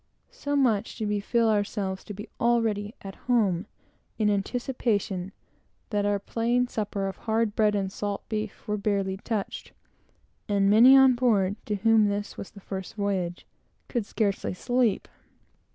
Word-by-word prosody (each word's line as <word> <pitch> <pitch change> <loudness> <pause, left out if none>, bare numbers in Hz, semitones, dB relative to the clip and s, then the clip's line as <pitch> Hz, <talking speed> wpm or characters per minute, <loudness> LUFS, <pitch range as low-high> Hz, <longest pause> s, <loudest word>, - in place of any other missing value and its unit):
So 285 0 -3
much 240 -8 +1
did 215 -3 -3
we 210 0 0
feel 230 +3 +1
ourselves 205 -2 -1
to 210 - -7
be 210 +3 -8
already 225 -2 +1
at 195 -1 -7 0.2
home, 205 -6 +2 0.5
in 210 -2 +2
anticipation, 200 -3 -1 0.6
that 205 -1 +1
our 205 0 +2
plain 235 +4 0
supper 205 -4 -3
of 190 - -5
hard 220 -1 0
bread 210 -1 +3
and 195 -1 -1
salt 205 0 -4
beef 215 -1 -5
was 210 0 -1
barely 200 -2 0
touched; 210 0 -4 0.8
and 200 -1 +3
many 245 +5 +8
on 265 -1 +7
board, 210 -6 +2
to 210 - 0
whom 220 +1 +4
this 205 0 -3
was - - -7
the 200 - -14
first 190 -1 -6
voyage, 190 -4 -2 0.4
could 235 -5 -2
scarcely 200 -4 -1
sleep. 245 +1 +1
210 Hz, 150 wpm, -27 LUFS, 200-230 Hz, 0.8 s, many